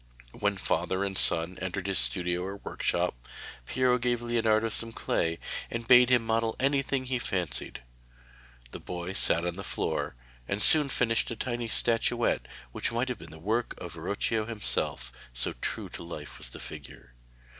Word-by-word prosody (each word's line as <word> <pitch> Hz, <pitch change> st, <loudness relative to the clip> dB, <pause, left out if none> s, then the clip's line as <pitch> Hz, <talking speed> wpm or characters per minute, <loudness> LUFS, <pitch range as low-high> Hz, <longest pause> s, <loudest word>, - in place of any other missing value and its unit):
When -, -, -1 dB
father 95 Hz, +1 st, -1 dB
and 100 Hz, -1 st, -3 dB
son 85 Hz, 0 st, +5 dB
entered 95 Hz, +1 st, -3 dB
his 100 Hz, -2 st, +2 dB
studio 90 Hz, -2 st, +1 dB
or 95 Hz, +2 st, -5 dB
workshop, -, -, -1 dB, 0.5 s
Piero 125 Hz, -1 st, +2 dB
gave 120 Hz, 0 st, 0 dB
Leonardo 115 Hz, -2 st, +2 dB
some 115 Hz, +1 st, -2 dB
clay, 85 Hz, -6 st, -1 dB, 0.3 s
and 115 Hz, -1 st, -5 dB
bade 125 Hz, 0 st, +7 dB
him 125 Hz, -2 st, +3 dB
model 115 Hz, 0 st, 0 dB
anything 135 Hz, -1 st, +1 dB
he 125 Hz, -1 st, -1 dB
fancied. 90 Hz, -, -3 dB, 0.9 s
The -, -, -7 dB
boy 90 Hz, +1 st, -5 dB
sat 85 Hz, -, +5 dB
down 85 Hz, -, -1 dB
on 85 Hz, -, -6 dB
the 100 Hz, -, -5 dB
floor, -, -, -2 dB, 0.3 s
and 100 Hz, -, -1 dB
soon 150 Hz, +5 st, +6 dB
finished 115 Hz, -3 st, +1 dB
a 115 Hz, -, -3 dB
tiny 120 Hz, 0 st, -3 dB
statuette 115 Hz, +1 st, +2 dB, 0.2 s
which -, -, -2 dB
might 120 Hz, +3 st, -1 dB
have 125 Hz, -5 st, -4 dB
been -, -, -11 dB
the 80 Hz, -, -11 dB
work 110 Hz, +8 st, -1 dB
of 90 Hz, -2 st, -7 dB
Verrocchio 100 Hz, +6 st, -1 dB
himself, 100 Hz, -, 0 dB, 0.2 s
so 60 Hz, -, 0 dB
true -, -, -2 dB
to -, -, -8 dB
life 85 Hz, -3 st, -8 dB
was -, -, -8 dB
the -, -, -10 dB
figure. -, -, -10 dB
110 Hz, 170 wpm, -28 LUFS, 90-120 Hz, 0.9 s, bade